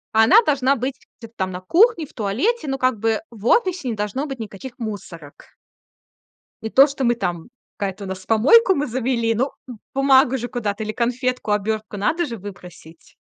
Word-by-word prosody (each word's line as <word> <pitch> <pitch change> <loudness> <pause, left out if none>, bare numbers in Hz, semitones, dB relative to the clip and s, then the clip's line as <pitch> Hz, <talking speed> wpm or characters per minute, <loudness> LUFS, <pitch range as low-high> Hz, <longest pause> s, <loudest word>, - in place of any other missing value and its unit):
Она 260 - +7
должна 275 -5 +2
быть 260 +1 -3 0.2
где-то 230 -1 -12
там 190 -3 -2
на 180 - -6
кухне, 340 - +3
в - - -21
туалете, 265 - -1
но, 270 0 -2
как 255 -4 0
бы, 225 0 0
в 225 -1 -7
офисе 370 - +2
не 230 - -2
должно 210 +8 -3
быть 270 -2 -6
никаких 225 +3 -8
мусорок. 175 -9 -9 1.1
И 220 - -3
то, 270 +5 +6
что 275 -1 -4
мы 240 -1 +3
там 175 -4 -4 0.3
какая-то 200 0 -4
у - - -7
нас, 190 0 -7
помойку 295 - +5
мы 290 -5 -2
завели, 235 -1 0
ну, 260 +4 0 0.2
б 250 - -8 0.2
бумагу 265 -1 +4
же 245 - -4
куда-то 220 -4 -3
или 215 0 -4
конфетку, 250 -1 -1
обёртку 210 0 -2
надо 320 - 0
же 235 -6 -6
выбросить. 180 -4 -13
235 Hz, 185 wpm, -21 LUFS, 205-270 Hz, 1.1 s, Она